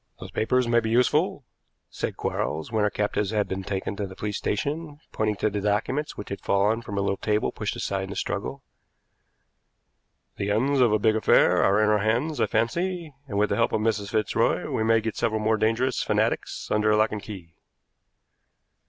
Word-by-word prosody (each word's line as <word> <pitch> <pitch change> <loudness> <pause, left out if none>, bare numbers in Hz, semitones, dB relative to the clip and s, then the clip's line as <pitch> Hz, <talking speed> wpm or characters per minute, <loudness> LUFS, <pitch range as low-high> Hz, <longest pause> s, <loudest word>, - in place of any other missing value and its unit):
"Those - - -9
papers 125 +2 +1
may 120 0 +4
be 110 -1 -3
useful," 145 - +2 0.5
said - - -4
Quarles, 80 +6 -2
when 110 -2 +1
our 105 - +3
captives 105 -1 -1
had 105 -1 0
been 95 0 -3
taken 95 +1 -3
to 100 - -2
the 95 - -11
police 105 0 -4
station, 145 +7 -3
pointing 110 -1 0
to 105 +1 0
the 100 0 -2
documents 110 +9 -1
which 105 - -7
had 100 - -5
fallen 105 +4 +2
from 100 -3 -6
a - - +1
little 100 0 0
table 105 0 0
pushed - - -4
aside 95 -1 -2
in - - -11
the 100 - -6
struggle. - - -3 1.7
"The 100 - -2
ends 130 +7 +2
of 120 -4 +5
a 110 - +4
big 110 +1 +2
affair 110 - +4
are 100 +2 +3
in 110 - +3
our 105 0 +3
hands, 120 +9 0
I - - +3
fancy, 170 +8 -1
and, 100 -6 -4
with 105 +1 +2
the - - +1
help 115 - +1
of 110 - +1
Mrs. 105 -2 0
Fitzroy, 110 -2 +1
we 110 - 0
may 115 0 +3
get 110 -1 -4
several 110 -2 0
more 110 +1 +2
dangerous 115 +4 +1
fanatics - - -1
under 105 0 +3
lock 110 +1 +3
and 105 - -4
key." 95 -5 -10
110 Hz, 200 wpm, -25 LUFS, 105-115 Hz, 1.7 s, of